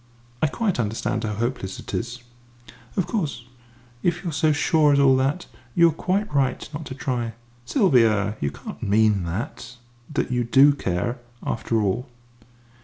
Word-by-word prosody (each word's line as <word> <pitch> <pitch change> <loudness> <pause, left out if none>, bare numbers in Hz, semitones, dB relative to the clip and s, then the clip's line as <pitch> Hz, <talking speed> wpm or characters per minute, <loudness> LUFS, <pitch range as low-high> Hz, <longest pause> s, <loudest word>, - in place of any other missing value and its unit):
I 155 - +4
quite 200 - -1
understand 115 +1 -1
how 105 -1 -2
hopeless 115 -4 -3
it - - -9
is." 120 +1 -4 0.7
"Of 185 - +2
course, 155 - -3 0.6
if 175 +4 0
you 170 - -2
are - - -8
so 155 +1 +3
sure 150 0 +3
as 140 - +4
all 135 -1 +6
that, 140 +7 0 0.3
you 170 -1 +6
are - - -3
quite 190 +4 -1
right 135 -2 +1
not 150 +1 -5
to 130 - -7
try." 120 -3 -2 0.3
"Sylvia! 115 - +3
You 70 - +1
can't - - -9
mean 105 -2 +3
that 100 +7 -5 0.4
that 145 - -1
you 125 -1 +1
do 135 +5 +6
care, 120 +1 -2 0.3
after 115 0 0
all?" 120 +7 -1
130 Hz, 165 wpm, -24 LUFS, 115-155 Hz, 0.7 s, all